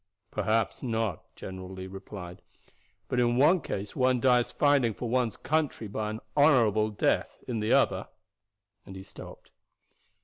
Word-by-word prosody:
"Perhaps 110 +2 0
not," 115 - -2
General 95 -1 -8
Lee 95 0 -7
replied; 95 -2 -9 0.7
"but 125 - -1
in 120 0 +2
one 155 +6 +5
case 100 -5 -5
one 130 -1 +2
dies 125 -1 +3
fighting 140 -7 +2
for 120 - -4
one's 120 -1 0
country 150 -7 -1
by 105 +1 -3
an 110 +1 -5 0.2
honorable 115 -8 +4
death, 105 - -1
in 120 -3 -2
the 105 +1 -1
other - - +2 0.4
" 100 0 -57
and 95 - -11
he 95 - -8
stopped. - - -12
110 Hz, 150 wpm, -28 LUFS, 100-125 Hz, 0.7 s, one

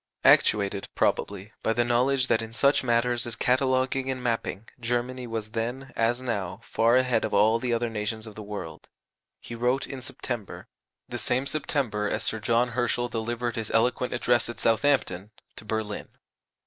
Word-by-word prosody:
Actuated, 100 -1 +4
probably, 100 +1 0
by 110 - +1
the 120 +1 +1
knowledge 125 +2 +3
that 115 - +2
in 115 0 -7
such 140 +4 +3
matters 120 0 +1
as 120 - -3
cataloguing 130 +1 +1
and 130 -1 -3
mapping 115 -3 -2
Germany 120 +1 -2
was 110 -2 -4
then, 120 +4 -4
as 115 +2 +1
now, 100 -8 -3
far 115 +2 +2
ahead 125 -3 +2
of 110 - -1
all 110 +3 +4
the 125 0 -2
other 120 0 +1
nations 110 0 -3
of 110 - -9
the 110 - -8
world, 105 -1 -7 0.5
he - - -9
wrote 125 +3 0
in 135 -1 -7
September 120 -4 -5 0.4
(the 120 - -5
same 125 +4 +1
September 130 -7 -1
as - - -1
Sir 110 - 0
John 120 +3 +2
Herschel 120 0 0
delivered 120 +1 -2
his 110 -2 -2
eloquent 125 +2 +1
address 120 -1 +2
at 120 - -6
Southampton) 115 -5 +2 0.3
to - - -10
Berlin. 110 -1 -3
120 Hz, 170 wpm, -27 LUFS, 110-125 Hz, 0.5 s, Actuated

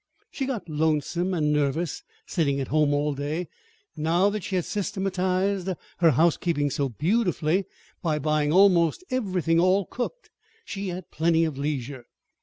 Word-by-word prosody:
She 270 - -3
got 230 -10 -4
lonesome 160 +3 0
and 150 -3 +1
nervous, 150 +2 0 0.2
sitting 140 -6 0
at 135 - -3
home 150 -1 +3
all 145 +1 +1
day; 150 +5 -3 0.5
and 150 - -5
now 175 +5 +3
that 210 -2 -4
she 190 - -3
had 180 - 0
systematized 190 -1 -1 0.3
her 170 -2 +6
housekeeping 160 -1 +2
so 140 +1 -1
beautifully 180 - +1 0.4
by 155 -3 0
buying 150 0 +1
almost 180 - +4
everything 185 -9 +1
all 185 +2 +3
cooked, 370 - -5 0.3
she 200 0 -5
had 180 -1 -6
plenty 165 +1 +2
of 155 -3 -3
leisure. 135 -3 -4
170 Hz, 150 wpm, -26 LUFS, 150-190 Hz, 0.5 s, her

